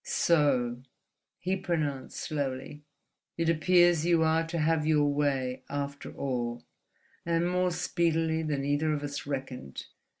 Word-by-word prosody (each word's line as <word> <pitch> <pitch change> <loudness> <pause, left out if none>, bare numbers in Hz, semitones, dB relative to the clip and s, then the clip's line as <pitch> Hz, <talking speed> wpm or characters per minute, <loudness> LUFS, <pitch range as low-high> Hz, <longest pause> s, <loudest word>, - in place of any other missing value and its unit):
"So," 130 -7 +2 0.6
he 185 +1 -1
pronounced, 155 -8 -2
slowly, 140 0 -4 0.6
"it 165 0 +1
appears 175 0 +4
you 170 -1 +3
are 160 +1 +2
to 170 +1 -3
have 160 0 +2
your 150 -2 +4
way, 135 -3 0
after 140 0 -4
all, 120 -5 -3 0.6
and 170 0 +1
more 180 0 +1
speedily 165 -2 0
than 145 -3 -2
either 145 +2 +1
of 145 -1 -3
us 145 -1 -5
reckoned. 130 - -5
150 Hz, 130 wpm, -29 LUFS, 140-165 Hz, 0.6 s, appears